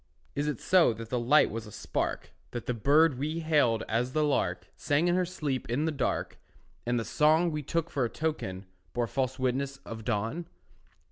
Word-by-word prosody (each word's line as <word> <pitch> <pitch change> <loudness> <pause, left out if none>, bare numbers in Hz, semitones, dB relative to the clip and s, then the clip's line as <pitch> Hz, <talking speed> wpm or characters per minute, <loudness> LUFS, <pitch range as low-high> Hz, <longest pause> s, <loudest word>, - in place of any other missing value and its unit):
Is 145 +1 -1
it 150 -6 -2
so, 180 -9 +4
that 115 +1 -9
the 125 - +1
light 130 +6 +4
was 115 0 -5
a - - -10
spark, - - -3 0.2
That 120 - -4
the 125 - -1
bird 145 +4 +4
we 155 +4 -2
hailed 145 -9 +2
as 120 +3 0
the 155 - +2
lark 90 - 0
Sang 150 +3 +1
in 175 - +3
her 180 0 +1
sleep 145 -10 -3
in 135 +6 0
the 160 - +1
dark, 145 - -2 0.5
And 120 0 +2
the 115 - -3
song 160 +3 +3
we 150 -1 -2
took 165 +3 -2
for 140 - 0
a 120 - 0
token 105 -13 -3 0.3
Bore 120 -1 0
false 130 +2 -2
witness 135 +1 -1
of 110 -1 -7
dawn? 115 +9 -2
135 Hz, 200 wpm, -29 LUFS, 115-155 Hz, 0.5 s, so